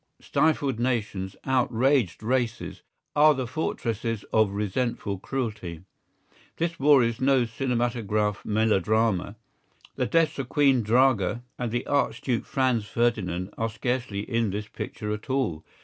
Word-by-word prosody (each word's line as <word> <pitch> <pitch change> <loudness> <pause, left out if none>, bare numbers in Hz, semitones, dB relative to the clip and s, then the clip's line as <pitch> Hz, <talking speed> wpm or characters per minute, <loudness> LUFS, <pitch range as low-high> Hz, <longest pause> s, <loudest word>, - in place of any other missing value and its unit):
Stifled 140 -6 +1
nations, 105 -6 -1
outraged 125 -5 +1
races, 120 -1 -1 0.3
are 150 0 +6
the 130 -1 -2
fortresses 115 -5 -2
of 110 -2 +4
resentful 105 0 -2
cruelty. 105 -10 -4 0.7
This 165 0 -2
war 140 -2 +6
is 115 0 -1
no 130 -2 +4
cinematograph 115 -4 -1
melodrama. 110 -1 +1 0.6
The - - 0
deaths 165 -3 +2
of 130 -2 -4
Queen 135 -4 +4
Draga 120 -1 +2 0.2
and 125 -1 -1
the 120 +1 -2
Archduke 140 -3 0
Franz 130 -5 +1
Ferdinand 105 -6 -1
are 115 0 0
scarcely 115 -2 -2
in 115 +1 0
this 105 +2 -4
picture 105 0 -5
at 105 +4 -7
all. 120 - -1
115 Hz, 125 wpm, -26 LUFS, 105-130 Hz, 0.7 s, are